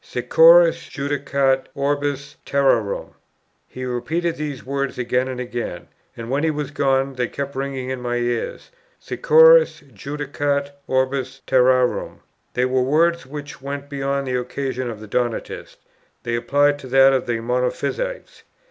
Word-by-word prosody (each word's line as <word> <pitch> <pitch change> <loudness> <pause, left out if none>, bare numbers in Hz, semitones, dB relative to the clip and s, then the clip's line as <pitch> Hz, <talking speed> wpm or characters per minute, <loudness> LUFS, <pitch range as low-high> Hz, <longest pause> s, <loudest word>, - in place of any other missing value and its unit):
"Securus - - +5
judicat 140 -2 0
orbis 145 0 -2
terrarum." 125 -7 0 0.5
He 130 0 -7
repeated 155 +8 -2
these 150 -3 -5
words 140 0 -3
again 125 +1 0
and 130 -1 -5
again, 120 -7 -5 0.3
and, 115 +1 -6
when 140 +3 0
he 160 - +2
was 150 -2 -3
gone, 135 -2 +1
they 125 -2 -1
kept 140 +2 -5
ringing 135 -1 -3
in 130 -1 -4
my 120 0 -2
ears. 120 - -3 0.3
"Securus - - +5
judicat 140 +3 -3 0.2
orbis 130 0 -1
terrarum;" 130 -1 +2 0.3
they 125 - +2
were 130 0 +1
words 165 +4 +2
which 145 -1 -8
went 140 +1 -6
beyond 140 0 -2
the 125 -1 -1
occasion 130 0 -4
of 110 -3 -7
the 110 - -9
Donatists: 120 +2 -3 0.5
they 120 - -3
applied 145 +4 +2
to 135 - -10
that 135 +1 +5
of 130 - 0
the 120 -1 -1
Monophysites. 125 - -3
135 Hz, 140 wpm, -21 LUFS, 125-145 Hz, 0.5 s, Securus